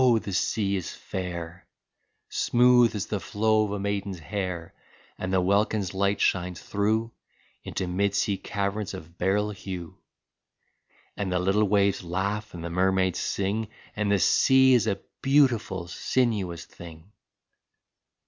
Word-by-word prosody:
the 100 - -5
sea 100 +1 0
is 95 -3 -3
fair, 90 -1 -6 0.6
Smooth 120 -1 +4
as 105 -1 -2
the 105 - -3
flow 110 +4 +1
of 100 - -5
a 105 - -2
maiden's 100 -1 -2
hair; 85 +1 -4 0.5
And 95 - -3
the 95 - +3
welkin's 100 0 +1
light 100 +1 +1
shines 90 -1 0
through 110 +3 0 0.5
Into - - -3
mid 100 +3 0
sea 100 -1 +1
caverns 100 +1 -3
of 85 -1 -12
beryl 105 +3 +1
hue, 95 -4 -7 1.2
And 100 -2 -3
the 90 - +1
little 95 +4 +2
waves 100 -1 +2
laugh 100 +4 -3
and 85 - -7
the 85 - -4
mermaids 95 0 +1
sing, 100 +3 -1 0.3
And 105 -1 0
the 100 - +4
sea 130 - +5
is 120 -3 +3
a 100 - -1 0.2
beautiful, 125 -10 +2
sinuous 95 -5 -1
thing! 85 +2 -13
100 Hz, 140 wpm, -26 LUFS, 90-105 Hz, 1.2 s, sea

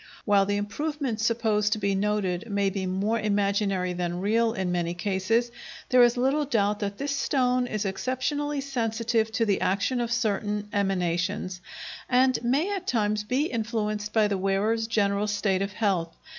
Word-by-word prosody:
While 200 -2 +4
the 205 0 0
improvement 260 +3 -3
supposed 220 -2 +1
to - - -2
be 200 -1 0
noted 205 0 -1
may 200 -1 +1
be 190 -1 -3
more 200 +5 0
imaginary 200 -3 0
than 175 0 -3
real 225 +4 +2
in 190 -5 -2
many 175 -1 -1
cases, 205 +6 0 0.4
there 250 -1 +6
is 240 +1 +5
little 270 +4 +2
doubt 210 -6 +1
that 200 -1 -3
this 280 +2 -2
stone 250 -3 +1
is 215 -3 -2
exceptionally 275 +8 -2
sensitive 230 -4 -1
to 230 - +1
the 200 -3 +1
action 200 +6 +1
of 235 -1 -2
certain 210 -3 -1
emanations, 185 -1 -1 0.5
and 255 0 +3
may, 290 +12 +1
at 375 -1 -6
times, 210 -3 +1
be 255 +7 0
influenced 215 -4 -2
by 220 -1 +3
the 200 -2 -1
wearer's 205 +4 +1
general 205 -2 +1
state 200 -2 0
of 200 +1 -2
health. 190 -6 0
210 Hz, 165 wpm, -26 LUFS, 200-240 Hz, 0.5 s, there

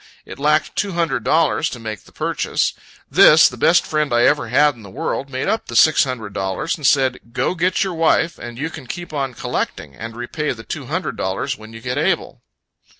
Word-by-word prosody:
It - - -10
lacked 150 +1 +1
two 200 -2 -1
hundred 155 -9 0
dollars 160 0 +2
to 120 - -8
make 110 -2 -7
the - - -18
purchase. - - -1 0.4
This, - - +7
the - - -6
best - - +3
friend 150 -3 -1
I 120 0 +3
ever 145 -5 +3
had 145 +5 +4
in 120 - -16
the 100 - -11
world, 135 +8 -3
made 130 0 -3
up 220 - -1
the 120 - -7
six 150 +6 +5
hundred 115 -6 -5
dollars, 95 - -2
and 150 -5 0
said, 130 -3 +3
"Go, 130 - 0
get 180 +2 +1
your 190 -2 -3
wife; 165 +1 +1
and 120 -1 -8
you 150 +5 -3
can 150 -6 -10
keep 175 +3 -7
on 135 -4 -2
collecting, 70 -8 -4
and 115 +8 -8
repay 130 +5 -3
the 115 -2 -11
two - - -6
hundred - - -3
dollars - - -2
when 110 +1 -13
you 115 0 -10
get 125 +1 -2
able." - - -1
135 Hz, 215 wpm, -20 LUFS, 115-155 Hz, 0.4 s, This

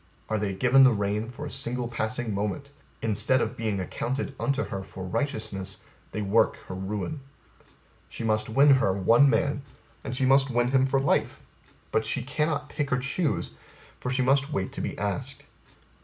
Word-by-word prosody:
Are 110 -1 0
they 100 -1 -1
given 130 +6 +5
the 130 -2 +7
rein 105 +2 -1
for 140 +4 -7
a 145 - -6
single 125 -2 -2
passing 110 0 -2
moment, 105 +8 -3 0.3
instead 110 +4 +2
of 110 - -1
being 110 -3 -2
accounted 130 +9 -3
unto 140 0 0
her 100 -2 -5
for 95 0 -9
righteousness, 110 - -3 0.3
they 105 - -3
work 100 +3 +3
her - - -6
ruin. 100 +10 -4 0.9
She - - -6
must 110 -1 0
win 140 +6 +6
her 130 -8 +4
one 115 +8 +5
man, 140 +4 +1 0.4
and 125 - -4
she 135 - +2
must 135 +1 +4
win 120 0 +1
him 135 -1 +4
for 135 0 +2
life; 135 - +1 0.5
but 110 - +2
she 115 +2 -1
cannot 150 +2 -1
pick 145 -1 -3
or 125 - +3
choose, 125 - -1 0.5
for 125 - -3
she 130 0 +1
must 135 +3 +2
wait 95 -9 -2
to - - -5
be - - -4
asked. 130 +7 -3
120 Hz, 180 wpm, -27 LUFS, 105-135 Hz, 0.9 s, the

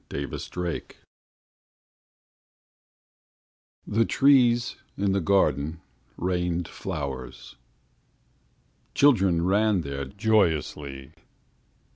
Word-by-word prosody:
XXVI 85 +4 -5 2.9
The 110 +2 +2
trees 120 -2 +3 0.2
in 100 0 +1
the 100 0 +1
garden 80 -4 +1 0.4
rained 90 -1 -1
flowers. 65 -3 -6 1.4
Children 95 -12 +4
ran 105 0 +2
there 70 -2 -5
joyously. 75 - -1
90 Hz, 60 wpm, -26 LUFS, 70-105 Hz, 2.9 s, Children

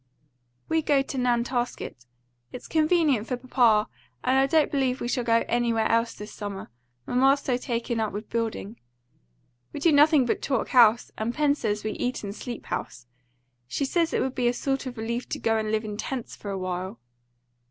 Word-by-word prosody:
"We 320 0 +1
go 285 -3 +2
to 270 - -6
Nantasket 240 - -1 0.4
it's 250 - -9
convenient 310 -7 +2
for 250 - -2
papa; 240 -4 +3 0.4
and 255 +1 +2
I 270 - +4
don't 310 +2 +3
believe 265 -3 0
we - - -3
shall 245 0 0
go 230 0 +2
anywhere 235 -2 +1
else 230 0 +1
this 210 +1 -9
summer, 200 - -6 0.3
mamma's 270 +3 +3
so 255 - 0
taken 235 -2 -2
up 220 -2 -1
with 205 +2 -6
building. 225 -1 -3 0.9
We - - -6
do 330 +3 +4
nothing 295 -2 +5
but 240 - -1
talk 265 -4 -1
house; 235 -2 +5
and 225 +2 -2
Pen 295 -2 +3
says 210 -7 -2
we 215 - -2
eat 250 +1 -3
and 200 -1 -4
sleep 240 -1 -7
house. 120 +1 -5 0.6
She 280 - -1
says 330 +4 +1
it - - 0
would 265 - -1
be 250 -2 0
a 240 - +2
sort 270 +1 -2
of 250 -1 -7
relief 235 +2 -3
to - - -3
go 225 0 +1
and 215 -1 -1
live 220 0 0
in 210 -1 -5
tents 250 +1 -5
for 205 - -8
a 195 - -2
while." 185 +3 -4
240 Hz, 195 wpm, -26 LUFS, 220-270 Hz, 0.9 s, nothing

